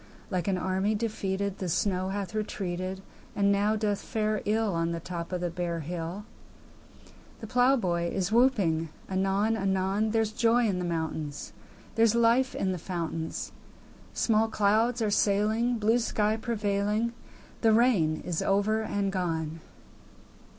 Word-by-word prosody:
Like 180 -2 -1
an 190 -2 +1
army 190 +3 0
defeated 200 -3 -2
The 185 - -3
snow 185 +1 0
hath 195 -1 -4
retreated, 190 -3 -3 0.3
And 200 0 +3
now 205 +2 +2
doth 210 -2 -1
fare 215 -1 -1
ill 215 -1 +1
On 165 0 0
the 170 - -3
top 170 0 -6
of 180 -1 -2
the 175 -1 -1
bare 170 -1 -3
hill; 170 +5 -5 1.1
The - - -7
plowboy 220 -8 +2
is 190 0 -1
whooping 200 -10 +3 0.2
anon 195 +3 +1
anon: 195 +1 0
There's 220 -1 +1
joy 235 +1 +3
in 195 -4 0
the 180 - -2
mountains; 160 -3 -3 0.4
There's 225 0 +3
life 235 +3 +3
in 190 - 0
the 180 - -3
fountains; 165 -2 -4 0.6
Small 220 -1 +2
clouds 225 +3 +2
are 210 - +1
sailing, 215 +4 +2
Blue 220 +2 +3
sky 215 -2 +1
prevailing; 215 0 -1 0.5
The 225 - +5
rain 210 -10 +3
is 170 -3 -1
over 205 +3 +2
and 200 -2 -1
gone! 165 -4 -2
200 Hz, 145 wpm, -28 LUFS, 180-220 Hz, 1.1 s, The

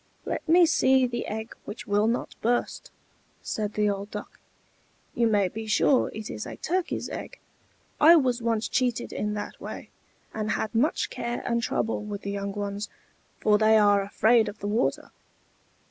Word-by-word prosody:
"Let - - -4
me 345 +1 +7
see 265 -5 +4
the 240 -1 -3
egg 220 +1 -5
which 210 - -7
will 205 +1 +2
not 235 +2 -1
burst," 240 +2 -1 0.5
said 210 -1 -3
the 210 0 +2
old 200 0 -2
Duck. 210 0 -8 0.7
"You 235 - +2
may 205 -3 +3
be 220 +4 -7
sure 250 +5 +3
it 215 -1 -7
is 210 - -6
a - - -7
turkey's 365 +2 -2
egg. - - -7 0.6
I 325 +3 +8
was 255 -6 +2
once 230 -1 0
cheated 245 -2 -1
in 210 0 -2
that 205 - -6
way, - - -8 0.4
and 215 -1 -3
had 220 - -2
much 275 +9 +1
care 240 0 -4
and 235 -1 0
trouble 225 -2 -1
with 210 -1 -6
the 200 - -3
young 200 0 -3
ones, 205 0 -4 0.5
for 210 -1 +4
they 220 0 +5
are 205 -1 +5
afraid 220 +3 +3
of 205 - -10
the 205 - -5
water. 220 +4 -1
220 Hz, 175 wpm, -26 LUFS, 205-240 Hz, 0.7 s, I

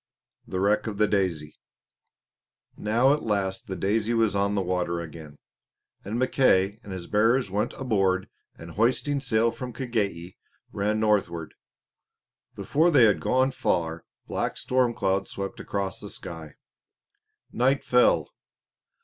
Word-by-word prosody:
The 95 - -3
Wreck 105 +4 +2
of 105 -2 -4
the 105 - +4
"Daisy" 90 -7 -1 1.2
Now 120 +6 +3
at 150 - -1
last 100 -3 -2
the 95 - -4
Daisy 110 +4 0
was 115 -3 +2
on 100 +1 +1
the 100 - 0
water 90 -1 -1
again; 80 -3 -9 0.7
and 105 +4 -4
Mackay 110 -6 +2
and 100 - -10
his 95 -2 -6
bearers 115 +2 +2
went 105 +4 -1
aboard 95 -7 0 0.3
and 80 +1 -11
hoisting 130 - +1
sail 115 -3 +2
from 125 +1 -7
Kagei 105 -8 -3 0.3
ran 105 +2 -1
northward. 95 -7 0 1.0
Before 160 +4 +2
they 145 -7 +5
had 105 -3 +4
gone 130 +1 +2
far 85 -9 -1 0.2
black - - -3
storm 125 -2 +1
clouds 95 0 0
swept 100 0 -5
across 100 -2 -3
the - - -7
sky. 80 -3 -8 1.0
Night 130 +3 +1
fell. 125 0 +3
105 Hz, 135 wpm, -26 LUFS, 95-120 Hz, 1.2 s, they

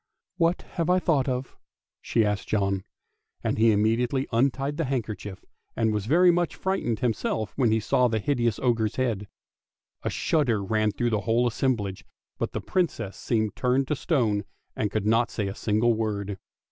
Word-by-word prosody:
" - - -58
What 170 +2 +1
have 170 -1 -3
I 180 - +5
thought 150 -7 +1
of? 130 0 -3 0.2
" - - -67
she 115 -2 +1
asked 105 -1 -1
John; 100 -2 0 0.6
and - - -1
he 115 0 +6
im 105 0 +2
mediately 120 +4 +1
untied 135 +4 +1
the 165 - 0
handkerchief, 105 -6 -4 0.3
and 110 -2 +1
was 105 -1 -2
very 175 +6 +6
much 175 -1 0
frightened 190 - -1
himself 110 -3 -1
when 125 -5 +2
he 110 - +3
saw 125 +3 +2
the 110 -2 0
hideous 120 -1 0
ogre's 115 -4 +1
head. 115 -6 -1 0.7
A - - -2
shudder 120 -10 +1
ran 110 +1 +1
through 120 +4 -1
the 105 -2 +1
whole 115 +2 +2
assemblage, 115 -5 -1 0.4
but - - -1
the - - -4
Princess 135 - -1
seemed 110 -2 -1
turned 130 +1 +1
to 150 - +1
stone, 115 -10 +1 0.3
and 105 - 0
could 105 0 -2
not 115 +2 +3
say 100 - -2
a 95 - -3
single 110 +3 +2
word. 100 -3 -2
115 Hz, 185 wpm, -26 LUFS, 105-135 Hz, 0.7 s, he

